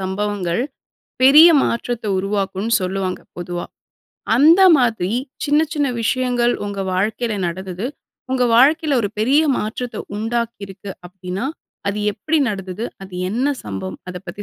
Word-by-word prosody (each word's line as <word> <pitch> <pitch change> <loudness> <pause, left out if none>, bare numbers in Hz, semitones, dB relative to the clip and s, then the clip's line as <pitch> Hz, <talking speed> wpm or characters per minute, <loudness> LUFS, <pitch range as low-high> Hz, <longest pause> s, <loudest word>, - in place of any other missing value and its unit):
சம்பவங்கள், 190 0 -2 0.6
பெரிய 300 +6 +9
மாற்றத்த 235 0 -2
உருவாக்கும் 195 +2 -2
சொல்லுவாங்க 185 0 -2 0.2
பொதுவா, 175 0 -4 0.7
அந்த 320 +8 +6 0.2
மாதிரி 225 -7 +1 0.3
சின்ன 295 +1 +3
சின்ன 290 -2 +1
விஷயங்கள் 245 0 +1
உங்க 200 -1 -4
வாழ்க்கையில 215 +4 -1
நடந்தது, 185 +4 -4 0.5
உங்க 255 -1 +2
வாழ்க்கையில 290 +3 +4
ஒரு 205 - -1
பெரிய 265 +7 +4 0.2
மாற்றத்த 235 +3 -4 0.2
உண்டாக்கி 235 0 -2
இருக்கு 195 0 -8 0.2
அப்டின்னா, 185 +4 -5 0.4
அது 200 +1 -2 0.2
எப்டி 310 +10 0
நடந்தது? 195 +2 -5 0.2
அது 190 -1 -12 0.2
என்ன 245 +6 0 0.2
சம்பவம்? 95 -2 -5
அத 180 - -8
பத்தி 200 +4 -6
210 Hz, 125 wpm, -20 LUFS, 190-245 Hz, 0.7 s, பெரிய